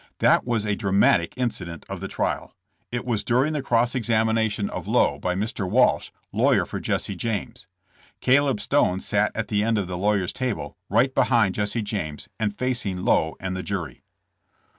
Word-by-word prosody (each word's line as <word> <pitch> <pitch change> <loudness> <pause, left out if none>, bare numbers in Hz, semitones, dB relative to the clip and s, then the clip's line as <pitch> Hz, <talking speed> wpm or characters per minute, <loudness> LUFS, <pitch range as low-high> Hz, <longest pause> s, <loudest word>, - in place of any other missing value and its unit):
That - - +3
was 115 -3 0
a 105 -1 0
dramatic 95 -5 +2
incident 90 -10 -3
of - - -6
the - - -5
trial. - - -3 0.4
It 120 0 -3
was 115 -4 -1
during 130 +6 +2
the 150 - -1
cross 120 -2 +1
examination 110 -3 +1
of - - -6
Lowe - - +2
by 90 0 -1
Mr. 100 -1 -2
Walsh, 125 +5 +3 0.2
lawyer - - +3
for - - -5
Jesse 100 - -1
James. 105 +1 -4 0.5
Caleb 135 -2 +3
Stone 100 -6 +1
sat 105 +1 +1
at 115 - -3
the 105 -1 +1
end 115 0 +1
of 100 - 0
the 90 0 -5
lawyer's 100 -2 +1
table, 125 -4 -3
right 120 +6 +3
behind 115 -8 +3
Jesse 105 +3 -1
James, 90 -8 -4
and 105 -2 -1
facing 120 -8 -2
Lowe 80 0 +2
and 95 -1 -3
the 95 - -3
jury. 85 -11 -5
105 Hz, 175 wpm, -24 LUFS, 95-120 Hz, 0.5 s, That